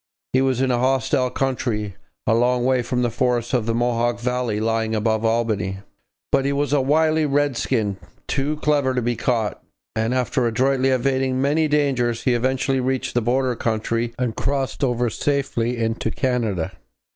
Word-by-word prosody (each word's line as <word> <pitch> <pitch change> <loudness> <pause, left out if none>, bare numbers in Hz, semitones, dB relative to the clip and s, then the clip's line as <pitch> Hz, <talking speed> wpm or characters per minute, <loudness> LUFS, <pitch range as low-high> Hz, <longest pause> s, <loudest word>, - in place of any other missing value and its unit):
He 130 - +4
was 130 -1 +1
in 130 -1 +2
a 120 - +1
hostile 130 0 +1
country, 120 -7 -2 0.3
a - - +3
long 120 +1 +2
way 130 -1 +3
from 125 +1 -1
the 120 - 0
forests 120 0 0
of 120 -3 +1
the 115 - +1
Mohawk 120 0 0
valley 125 -3 -1
lying 110 0 0
above 110 0 0
Albany. 110 -4 0 0.5
But 135 -1 +3
he 140 - 0
was 145 +1 0
a 145 - +4
wily 155 +3 +2
redskin, 130 -7 0 0.3
too 145 +3 -1
clever 140 -3 +2
to 125 - +1
be 120 +1 0
caught, 115 -5 -1 0.3
and 110 +3 0
after 125 -1 +1
adroitly 130 +3 +2
evading 130 0 +1
many 150 +4 +2
dangers 130 -6 +1
he 125 - +2
eventually 130 +2 +1
reached 130 0 -1
the 120 - +2
border 125 +2 +1
country 115 +1 -1
and 125 -3 -1
crossed 140 0 -2
over 125 -2 +1
safely 125 -3 -1
into 115 0 -1
Canada. 110 -9 -1
125 Hz, 170 wpm, -22 LUFS, 115-135 Hz, 0.5 s, He